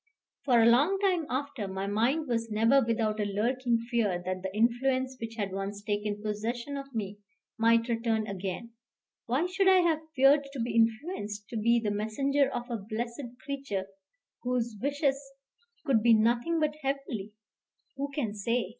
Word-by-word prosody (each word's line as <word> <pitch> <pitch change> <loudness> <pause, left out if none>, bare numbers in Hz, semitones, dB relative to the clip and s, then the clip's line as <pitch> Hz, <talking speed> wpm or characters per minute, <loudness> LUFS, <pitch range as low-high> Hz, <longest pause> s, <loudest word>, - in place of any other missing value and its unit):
For 250 -4 +5
a 225 - +6
long 280 +12 +5
time 365 -6 +1
after, 270 -5 -3
my 190 0 -3
mind 240 +10 +1
was 230 -2 -1
never 225 +6 +4
without 220 -2 0
a - - +2
lurking 235 +4 0
fear 230 -6 0
that 185 0 -2
the 190 0 -4
influence 255 +4 +1
which 225 0 -5
had 200 -4 -2
once 195 +1 -4
taken 210 0 -2
possession 235 +6 -3
of 275 -2 -7
me 205 -2 -4 0.4
might 230 +1 +4
return 230 -2 0
again. 195 +3 -5 0.6
Why 260 +8 +1
should 380 +2 +1
I 375 -1 +7
have 330 -3 +2 0.2
feared 275 +2 +5
to 275 - -6
be 235 +1 -2
influenced, 225 - 0
to - - -7
be 235 +2 +3
the 215 -2 -1
messenger 270 +7 +1
of 240 - -4
a 235 - -1
blessed 230 +5 -4 0.2
creature, 275 -9 -3 0.6
whose 245 -2 -1
wishes 280 0 0 0.6
could 260 -7 +3
be 230 0 +6
nothing 240 +9 +2
but 305 -1 0
heavenly? 270 -7 -3 0.6
Who 280 +1 -3
can 255 -8 -2
say? 230 +1 -1
235 Hz, 165 wpm, -29 LUFS, 215-275 Hz, 0.6 s, I